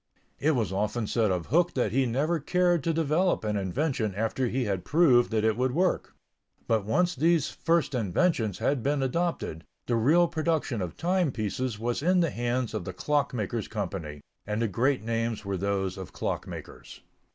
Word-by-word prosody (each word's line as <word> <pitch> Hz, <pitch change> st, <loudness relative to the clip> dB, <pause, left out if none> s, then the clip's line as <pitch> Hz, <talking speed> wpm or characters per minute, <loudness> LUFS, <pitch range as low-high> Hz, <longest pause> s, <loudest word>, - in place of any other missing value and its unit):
It 150 Hz, +2 st, +2 dB
was 110 Hz, -6 st, -1 dB
often 105 Hz, +4 st, -1 dB
said 110 Hz, 0 st, +1 dB
of 90 Hz, -3 st, -1 dB
Hooke 175 Hz, +2 st, +2 dB
that 120 Hz, -6 st, +1 dB
he 130 Hz, +2 st, +2 dB
never 150 Hz, +8 st, 0 dB
cared 175 Hz, +1 st, +2 dB
to 165 Hz, -, +2 dB
develop 165 Hz, +2 st, +1 dB
an 105 Hz, -1 st, -1 dB
invention 110 Hz, -, -1 dB
after 115 Hz, +4 st, 0 dB
he 125 Hz, +2 st, -1 dB
had 95 Hz, -3 st, -2 dB
proved 140 Hz, -7 st, +4 dB
that 110 Hz, -1 st, 0 dB
it 110 Hz, -1 st, +2 dB
would 125 Hz, +1 st, 0 dB
work. 185 Hz, +2 st, 0 dB, 0.5 s
But 110 Hz, -3 st, +1 dB
once 175 Hz, -, +2 dB
these 160 Hz, +1 st, +2 dB
first 165 Hz, -3 st, 0 dB
inventions 115 Hz, -, +1 dB
had 140 Hz, -3 st, 0 dB
been 140 Hz, +2 st, 0 dB
adopted, 135 Hz, -, -2 dB, 0.2 s
the 120 Hz, -, 0 dB
real 155 Hz, +10 st, +4 dB
production 160 Hz, -, -1 dB
of 90 Hz, -3 st, -5 dB
timepieces 130 Hz, -, -1 dB
was 120 Hz, +4 st, -2 dB
in 180 Hz, +4 st, +3 dB
the 165 Hz, -, +1 dB
hands 120 Hz, 0 st, -1 dB
of 110 Hz, -4 st, -3 dB
the 95 Hz, -, -6 dB
Clock 145 Hz, +8 st, 0 dB
makers' 110 Hz, 0 st, -2 dB
Company, 85 Hz, -9 st, -5 dB, 0.3 s
and 105 Hz, +1 st, -1 dB
the 115 Hz, -, +1 dB
great 125 Hz, +5 st, +1 dB
names 115 Hz, -1 st, -2 dB
were 100 Hz, 0 st, -2 dB
those 95 Hz, 0 st, -1 dB
of 95 Hz, -, -8 dB
clock -, -, -3 dB
makers. -, -, -10 dB
120 Hz, 185 wpm, -28 LUFS, 105-155 Hz, 0.5 s, proved